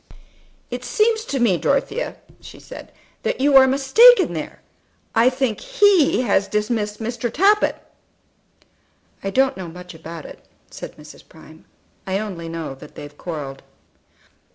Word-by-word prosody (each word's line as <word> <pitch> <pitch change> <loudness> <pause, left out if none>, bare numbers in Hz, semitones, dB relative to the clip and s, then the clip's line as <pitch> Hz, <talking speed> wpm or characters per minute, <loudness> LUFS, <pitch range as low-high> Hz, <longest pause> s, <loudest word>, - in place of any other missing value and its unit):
"It - - -5
seems 445 0 +1
to 275 - -3
me, 220 -7 +3
Dorothea," 415 - -1 0.2
she - - -13
said, - - -11 0.3
"that - - -2
you 280 +1 +3
are 265 -1 +8
mistaken 280 - +5
there. - - -6 0.5
I 230 +3 +5
think 255 -4 -2
he 405 - +3
has 200 -3 +1
dismissed 210 -1 -2
Mr. 235 +1 -3
Tappitt." 410 +5 +3 1.5
"I 195 - -2
don't 265 +6 +2
know 185 -2 -6
much 180 +2 -11
about 165 0 -9
it," - - -12 0.3
said - - -9
Mrs. 150 0 -15
Prime; 160 0 -16 0.4
"I 190 0 0
only 185 -6 -5
know 165 -4 -5
that 135 - -14
they've 145 0 -10
quarrelled." 145 -5 -7
225 Hz, 140 wpm, -21 LUFS, 170-275 Hz, 1.5 s, are